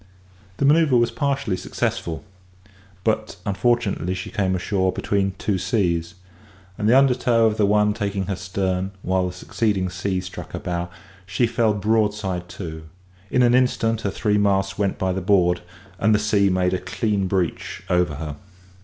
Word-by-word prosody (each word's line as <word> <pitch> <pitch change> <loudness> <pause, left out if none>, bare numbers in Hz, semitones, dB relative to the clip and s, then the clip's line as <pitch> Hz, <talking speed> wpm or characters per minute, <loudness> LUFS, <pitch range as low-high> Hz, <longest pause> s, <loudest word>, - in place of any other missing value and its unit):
The - - +1
manoeuvre 150 -2 +5
was 120 0 +2
partially 140 -9 -1
successful; 80 -1 -3 0.8
but 110 -2 0
unfortunately 100 -4 0
she 90 - -6
came 95 -2 0
ashore 95 0 0
between 100 0 -1
two 100 -2 -1
seas; 85 -7 0 0.6
and 105 +2 0
the 125 - +6
undertow 125 -4 +3
of 110 -1 +2
the 105 - +3
one 105 0 +3
taking 100 -3 -2
her 95 - -2
stern, 95 0 -2
whilst 90 0 -1
the - - -11
succeeding 100 -4 0
sea 95 +1 -2
struck 95 +1 -8
her - - -3
bow, 85 0 -3 0.4
she 95 +5 +1
fell 115 -2 +1
broadside 105 -4 0
to 80 -4 -7 0.4
in 125 - +3
an 120 0 +4
instant, 115 -3 +2
her 100 - -1
three 105 +1 +1
masts 95 -1 +1
went 100 -2 -1
by 95 -1 0
the 95 - -2
board, 90 -2 +3 0.4
and 110 +1 +4
the - - +4
sea 105 -2 +2
made 90 0 +1
a 95 - 0
clean 100 +2 -1
breach 90 -3 -2
over 90 -4 +1
her. 75 0 -6
100 Hz, 165 wpm, -22 LUFS, 90-110 Hz, 0.8 s, the